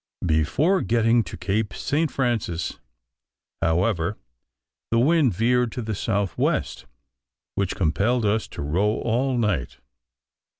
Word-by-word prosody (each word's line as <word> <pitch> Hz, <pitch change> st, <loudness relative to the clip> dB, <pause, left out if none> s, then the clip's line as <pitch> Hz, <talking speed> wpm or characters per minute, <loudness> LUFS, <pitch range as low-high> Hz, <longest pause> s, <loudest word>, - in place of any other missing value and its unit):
Before 90 Hz, -, +2 dB
getting 115 Hz, 0 st, +3 dB
to 90 Hz, -, -8 dB
Cape 100 Hz, +3 st, -1 dB
St. 155 Hz, +2 st, 0 dB
Francis, 115 Hz, -, -2 dB, 0.8 s
however, 85 Hz, +3 st, +1 dB, 0.7 s
the 115 Hz, -, +1 dB
wind 145 Hz, +1 st, +4 dB
veered 120 Hz, +3 st, +2 dB
to 125 Hz, -, -4 dB
the 110 Hz, 0 st, -3 dB
south 100 Hz, -3 st, -1 dB
west, -, -, -1 dB, 0.7 s
which 100 Hz, -2 st, -1 dB
compelled 100 Hz, +8 st, +1 dB
us 105 Hz, +2 st, +1 dB
to -, -, -7 dB
row 95 Hz, +9 st, +1 dB
all 125 Hz, +3 st, 0 dB
night. 105 Hz, -, -1 dB
110 Hz, 120 wpm, -24 LUFS, 95-120 Hz, 0.8 s, wind